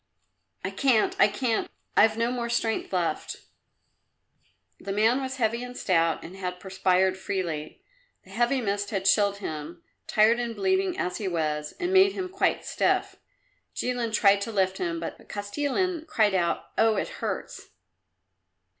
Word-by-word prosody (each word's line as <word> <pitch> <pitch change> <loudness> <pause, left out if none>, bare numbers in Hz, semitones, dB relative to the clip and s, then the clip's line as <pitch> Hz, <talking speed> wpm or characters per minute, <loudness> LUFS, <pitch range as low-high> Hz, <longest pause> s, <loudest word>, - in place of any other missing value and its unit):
"I 190 - -2
can't, 230 +1 +2
I - - +7
can't! 225 +2 -1 0.3
I've 220 0 +5
no 230 +1 +1
more 240 -1 -3
strength 235 -1 -1
left." 180 -3 -1 1.4
The 200 - -5
man 220 +6 +3
was 265 0 -4
heavy 235 -1 0
and 250 0 -8
stout 165 -3 +1
and 175 - -9
had 180 -2 -5
perspired 190 0 +1
freely. 170 -6 -4 0.4
The 190 - -17
heavy 240 +5 +1
mist 205 -2 -1
had 195 -3 -2
chilled 200 0 +3
him, 155 -4 -6 0.2
tired 220 +3 +4
and 235 -1 -3
bleeding 380 -1 +1
as 180 - -2
he 205 - -3
was, 150 -3 -2
and 360 +1 -1
made 385 +1 +6
him 370 -1 -4
quite 385 +2 0
stiff. - - 0 0.6
Jilin 245 -2 -1
tried 200 -2 +4
to 225 - -3
lift 190 -2 0
him, 170 -2 -2
but 165 - -7
Kostilin 295 - -2
cried 215 -7 +2
out, 175 -2 -1
"Oh, 225 -1 +4
it - - -1
hurts!" - - -4
210 Hz, 155 wpm, -26 LUFS, 185-245 Hz, 1.4 s, I